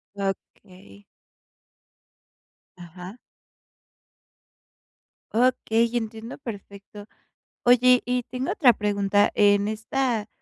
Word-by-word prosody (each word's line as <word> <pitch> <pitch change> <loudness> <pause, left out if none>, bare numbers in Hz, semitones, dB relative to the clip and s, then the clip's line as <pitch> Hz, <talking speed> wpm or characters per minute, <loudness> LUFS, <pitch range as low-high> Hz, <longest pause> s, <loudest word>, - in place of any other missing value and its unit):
Okey. 185 - -7 1.7
Ajá. 180 +5 -11 2.2
Okey, 235 -1 +2
entiendo 225 0 -5
perfecto. 205 -4 -10 0.6
Oye, 250 +1 +5
y 250 0 -1
tengo 255 +2 -3
otra 255 -6 +5
pregunta, 205 -1 +1
en 205 -1 +3
esta, 225 0 -2
215 Hz, 70 wpm, -24 LUFS, 200-245 Hz, 2.2 s, Oye